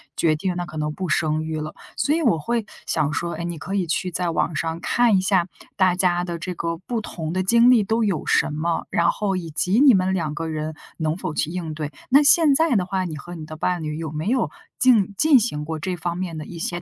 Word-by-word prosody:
决 160 -2 +2
定 180 +2 -2
那 175 - -3
可 155 -1 -9
能 150 0 -2
不 185 0 -4
生 155 0 +1
育 160 0 -3
了。 155 0 -5 0.2
所 295 - +2
以 335 - 0
我 225 - +3
会 230 +6 -1 0.2
想 150 0 0
说， 170 +3 -2
哎， 170 +1 -5
你 170 -1 -4
可 180 +6 -6
以 190 -3 +1
去 180 +3 -1
在 175 0 -1
网 165 -1 -1
上 165 0 -2
看 235 +1 +3
一 - - +2
下， 185 -2 +2 0.3
大 185 -2 +3
家 175 -1 +2
的 170 -1 -4
这 180 +2 -4
个 165 -1 -3
不 225 +6 -4
同 160 -6 -5
的 185 - 0
经 235 +5 +5
历 235 -4 +5
都 225 +3 0
有 185 -7 -1
什 - - +2
么？ 165 +2 -1
然 170 - +3
后 200 -2 -1
以 170 -3 -4
及 185 +9 +1
你 275 -5 +8
们 190 0 +1
两 160 -5 -1
个 165 +1 -3
人 155 0 -3 0.2
能 160 +1 -1
否 - - -4
去 150 - -1
应 170 -3 -4
对？ 150 -1 -5 0.2
那 275 +3 +6
现 310 -1 +6
在 320 -4 +3
的 185 -4 +2
话， 190 0 -1
你 155 -3 -5
和 175 +5 -9
你 160 -2 -7
的 155 0 -9
伴 175 +1 -1
侣 150 0 -4
有 160 -1 -4
没 155 +3 -4
有 255 -2 +1 0.3
进 225 -7 +4
进 305 -4 +6
行 150 -10 -2
过 160 0 -4
这 185 +2 -3
方 170 +1 -3
面 175 -4 -4
的 155 - -6
一 170 - -9
些 175 +1 -3
175 Hz, 280 characters per minute, -23 LUFS, 160-195 Hz, 0.3 s, 你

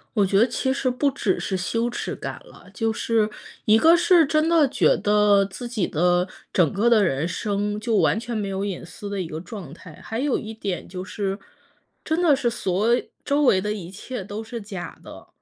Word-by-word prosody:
我 205 -3 +4
觉 195 +1 +2
得 230 - +5
其 260 +2 -1
实 265 -1 0
不 265 +3 +1
只 210 -8 0
是 190 - -2
羞 230 +6 -1
耻 240 - -4
感 - - -6
了， - - -16
就 225 -2 0
是 220 -1 +1 0.4
一 215 +1 +6
个 330 +9 +6
是 350 -1 +5
真 310 +2 +2
的 330 -3 +5
觉 - - +3
得， 205 -1 +4
自 200 +5 -6
己 225 -6 -1
的 175 +2 +2 0.3
整 170 -6 +3
个 215 +4 +2
的 225 -3 +5
人 155 -3 0
生， 205 +2 -2
就 220 0 0
完 - - +3
全 235 +1 -4
没 205 -2 -2
有 195 0 -3
隐 195 -3 -4
私 190 +5 -9
的 200 -1 -3
一 175 - -4
个 160 0 -6
状 180 -5 -9
态。 165 -2 -13
还 225 - -5
有 280 0 +1
一 220 +1 -7
点 200 -4 -4
就 185 0 -6
是， 195 0 -3 0.7
真 320 +2 0
的 335 -4 +5
是 260 -3 +1
所 220 0 +1 0.3
周 290 +1 +2
围 220 -9 +5
的 210 +2 -2
一 185 -4 -7
切 210 +3 -6
都 205 +3 -6
是 225 +1 -7
假 195 -5 -7
的。 - - -12
210 Hz, 235 characters per minute, -23 LUFS, 190-240 Hz, 0.7 s, 一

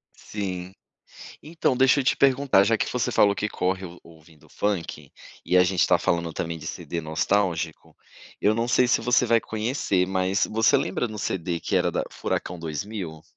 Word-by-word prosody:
Sim. 95 -3 -6 0.7
Então, 160 -5 -1
deixa 130 +2 +4
eu - - -3
te - - +2
perguntar, 135 -6 +4
já 115 +1 +2
que - - -2
você 125 -2 -1
falou 100 -1 +4
que 105 - -2
corre 95 0 -2
o 85 0 -12
ouvindo 80 -2 -19
funk, 100 -5 -3 0.3
e 90 - +1
a 90 - +7
gente 90 -1 +2
tá - - +3
falando 85 -1 -1
também 80 +1 -4
de - - -10
CD 85 - -5
nostálgico, 80 +1 -1 0.5
eu 105 +1 +3
não 115 +1 -1
sei 125 +1 +4
se - - +3
você 125 +2 +3
vai 115 0 +3
conhecer, 110 -5 -1
mas 95 +1 0
você 115 +1 +3
lembra 125 - -1
no 105 -1 -8
CD, 85 -2 -2
que - - -1
era - - +2
da - - -1
Furacão 90 -1 -4
2000? 80 0 -6
95 Hz, 185 wpm, -25 LUFS, 85-115 Hz, 0.7 s, a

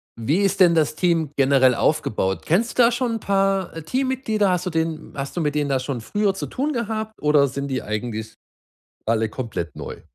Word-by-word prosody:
wie 140 - 0
ist 195 0 +1
denn 175 -3 +6
das 155 -1 +2
Team 165 -4 +1
generell 135 -2 +4
aufgebaut? 105 -10 0
Kennst 220 +9 +1
du 250 - +7
da 235 - +5
schon 240 -1 -1
'n 225 - -2
paar, 195 -3 0
äh, 165 - -5
Teammitglieder? 245 - 0
Hast 180 0 -1
du - - 0
den 160 -1 -2
hast 140 0 -5
du 175 - -1
mit 150 -1 -1
denen 145 -1 0
da 135 -1 +1
schon 130 -1 -4
früher 205 - 0
zu - - -4
tun 290 +3 -2
gehabt 220 -2 -3
oder 150 -1 +4
sind 140 +1 -4
die 130 -1 -1
eigentlich 110 0 -4 0.7
alle 110 -1 +1
komplett 105 - -5
neu? - - -8
160 Hz, 205 wpm, -22 LUFS, 135-200 Hz, 0.7 s, du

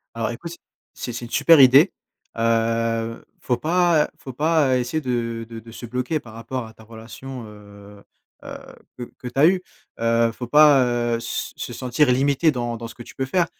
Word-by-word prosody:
Alors 115 -1 -1
écoute 165 +8 -7 0.4
c'est 120 - -6
c'est 120 - -5
une 120 - -10
super 165 +4 +5
idée, 135 +7 +7 0.5
heu, 115 0 0 0.2
faut 125 - 0
pas, 165 +2 +2
heu, - - -6
faut 130 - -9
pas, 155 +1 +2
heu, - - +2
essayer 125 +6 -2
de 115 -4 -3
de 115 -1 -8
de 115 +1 -12
se 120 - -8
bloquer 125 +6 -2
par 110 -5 -14
rapport 115 +2 -5
à 110 - -14
ta 110 - -17
relation, 115 +3 -10
heu 100 -1 -15 0.4
heu, - - -7 0.4
que 125 - -4
que 125 - -7
tu 125 - -8
as 150 - +7
eu, 185 +1 +2 0.4
heu, 115 0 +2
faut 120 +1 -7
pas, 150 -2 +6
heu, 120 -1 0
s 115 - -5
se - - -6
sentir 125 +2 +1
limité 140 +5 +2
dans 120 -4 -3
dans 115 0 -7
ce - - -12
que 120 - -10
tu - - -14
peux 135 - -2
faire, 170 +6 +1
120 Hz, 205 wpm, -22 LUFS, 115-140 Hz, 0.5 s, idée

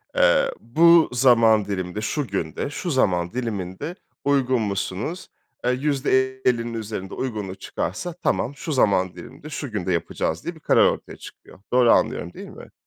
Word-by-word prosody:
eee, - - +4
"Bu 165 +5 +5
zaman 115 -4 +4
diliminde, 95 0 -3
şu 140 +5 -2
günde, 95 - -3
şu 170 +4 -4
zaman 90 -9 +1
diliminde 115 - -4 0.3
uygun 130 -4 +2
musunuz?" 100 - -3 0.4
Eee, 125 - +3
%50'nin 130 -3 0
üzerinde 105 -4 -5
uygunluk 105 -7 -4
çıkarsa 175 - -4
tamam, 145 -5 -1
"Şu 155 - -5
zaman 95 -9 +2
diliminde, 120 - -11
şu 145 -3 -5
günde 95 -4 -2
yapacağız." 80 -1 -2
diye 170 0 -5
bir - - -15
karar - - +4
ortaya - - -2
çıkıyor. - - -14
Doğru 125 -2 +5
anlıyorum, 85 0 +1
değil - - -9
mi? - - -12
120 Hz, 150 wpm, -23 LUFS, 100-145 Hz, 0.4 s, Bu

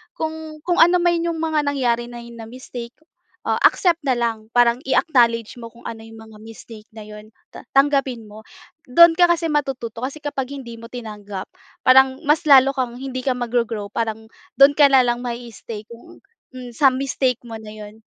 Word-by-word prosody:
Kung, 315 -1 -6
kung 350 +1 0
ano 350 +1 +3
man 345 -1 +2
yung 335 -1 -3
mga 315 -2 0
nangyari 245 -4 0
na 240 - -9
hi 235 - -12
na 230 -1 -10
mistake, 245 -1 -9 0.5
ah, - - +1
accept 345 -3 +3
na 265 - +2
lang. 230 -2 -3
Parang 240 -1 +4
i-acknowledge 235 -6 +1
mo 230 - -9
kung 235 - -18
ano 225 -1 -8
yung 225 0 -13
mga 215 - -15
mistake 225 -1 -12
na 220 - -9
'yon 210 +1 -13 0.2
ta - - -11
tanggapin 275 -4 +1
mo. 215 +1 -13 0.5
Do'n 340 +5 +7
ka 355 - +6
kasi 335 -1 +1
matututo, 260 -6 -3
kasi 275 +3 -7
kapag 275 -3 -4
hindi 250 -4 -8
mo 230 - -11
tinanggap, 210 -5 -8 0.4
parang 265 0 +5
mas 305 +4 +2
lalo 270 -1 +7
kang 255 -3 -2
hindi 255 -1 -5
ka 265 - +1
mag-go-grow. 230 -4 -2
Parang, 220 -1 -3 0.3
doon 280 +1 +8
ka 290 -2 +6
na 265 - +7
lang 240 0 -1
ma-i-stay 235 -3 -7
kung 235 0 -15 0.3
mm, 250 -2 -9 0.2
mistake 260 -2 -1
mo 225 -1 -8
na 215 -1 -11
'yon. 215 +1 -12
245 Hz, 185 wpm, -20 LUFS, 225-280 Hz, 0.5 s, doon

